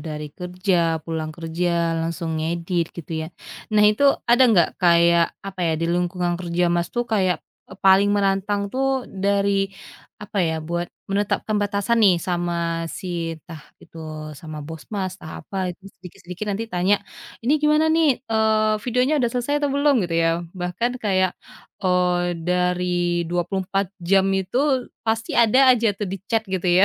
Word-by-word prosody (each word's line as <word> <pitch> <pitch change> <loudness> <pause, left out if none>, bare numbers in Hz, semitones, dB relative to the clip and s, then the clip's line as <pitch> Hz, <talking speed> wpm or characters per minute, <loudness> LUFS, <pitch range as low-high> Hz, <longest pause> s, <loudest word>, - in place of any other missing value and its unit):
dari 150 -1 -5
kerja, 180 -2 0
pulang 160 -1 -3
kerja 170 0 -1
langsung 165 -1 -3
ngedit, 170 +1 -1
gitu 170 -1 -7
ya. 160 - -4 0.4
Nah 210 -1 +4
itu 210 +6 +4 0.2
ada 240 +2 +5
enggak 180 -7 +4
kayak, 170 -1 +4
apa 195 -1 -7
ya, - - +2
di - - 0
lingkungan 175 0 0
kerja 175 0 0
Mas 175 0 0
tuh 240 +4 -2
kayak, 185 -4 +2 0.3
e - - -9
paling 195 +1 +6
menantang 200 +1 +1
tuh 265 -1 0
dari, 200 0 0 0.5
apa 205 0 -5
ya, 160 - 0
buat 175 0 -2 0.2
menetapkan 205 +1 0
batasan 205 +3 0
nih 185 - +6
sama 170 -2 -2
si 170 -1 -4
entah 160 -1 -12 0.2
itu 165 - -14 0.4
sama 155 -2 -8
bos 160 -1 -8
Mas, 190 -2 -3
entah 160 - -8
apa 195 - -9 0.2
itu 185 - -23
sedikit-sedikit 180 +2 -9
nanti 205 +3 -2
tanya, 180 +3 +3 0.5
"Ini 245 +5 +2
gimana 300 +1 +4
nih, 325 -1 +4 0.2
eee, 220 -1 +3
videonya 250 +4 +1
udah 240 -3 +1
selesai 250 +3 -1
atau 290 -1 0
belum?" 285 0 +3
gitu 170 -1 -3
ya. 165 - +3 0.3
Bahkan 180 +7 -1
kayak, 185 -2 +2 0.5
eee, 180 -1 +2 0.3
dari 180 -1 0
24 190 +3 -1 0.2
jam 195 -1 +5
itu 190 +6 -2 0.5
pasti 225 0 -1
ada 230 +3 +3
aja 235 -2 +1
tuh 210 - -2
di - - -2
chat 225 -1 +2
gitu 185 -1 -2
ya, 190 - +7
185 Hz, 160 wpm, -22 LUFS, 170-210 Hz, 0.5 s, ya